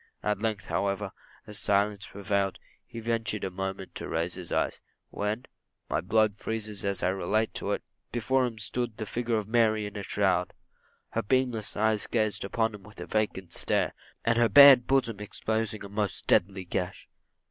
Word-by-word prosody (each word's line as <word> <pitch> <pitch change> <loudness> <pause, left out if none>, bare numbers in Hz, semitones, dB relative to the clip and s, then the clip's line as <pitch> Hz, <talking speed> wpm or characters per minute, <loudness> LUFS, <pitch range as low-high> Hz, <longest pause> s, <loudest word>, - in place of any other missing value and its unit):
At 105 -1 0
length, 110 -3 -1
however, 100 0 -1 0.3
as 105 0 -7
silence 100 0 +1
again - - -14
prevailed, 100 -1 0 0.3
he 115 - -8
ventured 115 -2 -2
for 95 - -1
a - - -17
moment 95 0 -5
to - - -5
raise 85 +2 -1
his 90 -2 -7
eyes, - - 0 0.3
when 105 +5 -2 0.5
my 75 - +1
blood 105 +3 +2
freezes 110 -2 -3
as 100 -2 -1
I 90 - +3
relate 95 +4 0
it - - -2 0.3
before 125 +3 +1
him 115 -2 -7
stood 115 +2 -2
the 110 - -4
figure 120 +2 -1
of 105 -2 -1
Mary 110 -2 +3
in 105 0 -7
a 100 - -3
shroud - - +1 0.6
her 115 - -1
beamless 120 -2 0
eyes 110 0 +2
fixed 110 -3 0
upon 110 +2 0
him 105 - -9
with 105 +1 -15
a 90 - -5
vacant 95 -5 -2
stare; - - 0 0.3
and 115 0 +3
her 120 -1 +4
bared 130 +1 +9
bosom 125 -6 +1
exposing 110 0 -2
a - - -6
most 105 -1 -2
deadly 95 0 +2
gash. 90 +2 -3
105 Hz, 180 wpm, -28 LUFS, 100-115 Hz, 0.6 s, bared